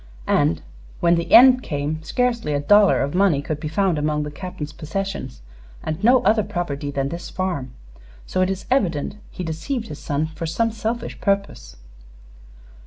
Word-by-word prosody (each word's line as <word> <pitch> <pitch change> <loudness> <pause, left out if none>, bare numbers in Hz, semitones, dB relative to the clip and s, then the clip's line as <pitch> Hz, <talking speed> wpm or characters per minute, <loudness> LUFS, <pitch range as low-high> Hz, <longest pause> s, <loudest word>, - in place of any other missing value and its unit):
And, 145 +2 +1 0.4
when 170 0 +4
the 170 -1 -1
end 255 0 +8
came, 150 - -3
scarcely 235 - -1
a 145 - +1
dollar 205 +7 +5
of 140 - -3
money 185 -5 +3
could 150 +1 -4
be 155 - -4
found 175 0 +1
among 150 0 0
the 150 - -5
Captain's 155 -2 -7
possessions, 160 - -5 0.4
and 155 +5 -4
no 245 +2 +5
other 215 +2 +4
property 150 -7 -3
than 140 -1 -2
this 170 +3 -6
farm; 175 -9 -3 0.5
so 185 - -1
it 185 - +2
is 195 0 -4
evident 190 - 0
he 185 - -6
deceived 220 - -4
his 150 - -7
son 145 +1 -1
for 160 +1 -6
some 225 +8 0
selfish 225 +2 -4
purpose. 195 - -1
170 Hz, 170 wpm, -22 LUFS, 150-200 Hz, 0.5 s, end